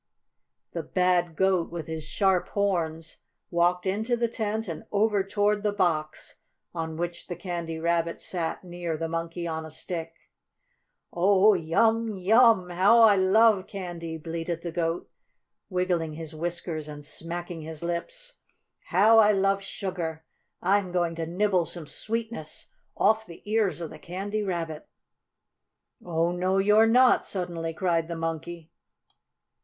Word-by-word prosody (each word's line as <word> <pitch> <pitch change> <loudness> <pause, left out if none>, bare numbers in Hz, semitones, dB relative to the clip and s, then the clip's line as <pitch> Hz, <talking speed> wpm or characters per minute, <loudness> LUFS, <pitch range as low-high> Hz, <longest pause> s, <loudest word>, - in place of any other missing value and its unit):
The - - -3
bad 180 -2 +1
Goat, 190 -1 +2
with 170 -2 -5
his 160 -1 -5
sharp 185 +3 +1
horns, 165 -5 -1 0.3
walked 175 +1 +2
into 220 +6 0
the 235 0 +1
tent 220 -1 -3
and 165 -3 -5
over 210 -1 +2
toward 205 +1 +1
the 210 0 +1
box 165 -6 -1 0.3
on 160 -2 -4
which 175 0 -4
the 175 - -4
Candy 170 -2 -4
Rabbit 170 0 0
sat 170 -1 -3
near 175 -2 -4
the 165 +1 -2
Monkey 165 +1 -4
on 160 -1 -3
a 160 - -8
Stick. 165 +1 -7 0.8
"Oh, 195 +4 +5
yum 220 +6 +1
yum! 205 -1 +4
How 195 +7 +5
I 215 -2 +7
love 200 +1 +4
candy!" 175 -4 -6
bleated 165 +1 -4
the 170 - -4
goat, 165 0 -2 0.6
wiggling 180 -4 0
his 160 0 -7
whiskers 165 -1 -4
and 145 -1 -9
smacking 170 +2 -6
his 160 0 -8
lips. - - -4 0.5
"How 215 +5 +5
I 210 -1 +6
love 195 0 +2
sugar! 175 -5 -5 0.4
I'm 190 0 +2
going 175 -2 0
to 165 -1 -4
nibble 185 0 +1
some 170 0 -5
sweetness 220 +1 -5 0.3
off 220 0 +3
the 170 - -12
ears 210 -4 +1
of 165 - -5
the 155 - -11
Candy 200 +6 -4
Rabbit." 170 -6 -4 1.2
"Oh, 170 0 0
no 185 +2 0
you're 210 +3 +5
not!" 250 +2 +5
suddenly 170 -3 -3
cried 165 -2 0
the 170 - -4
Monkey. 165 0 -5
175 Hz, 140 wpm, -27 LUFS, 165-200 Hz, 1.2 s, I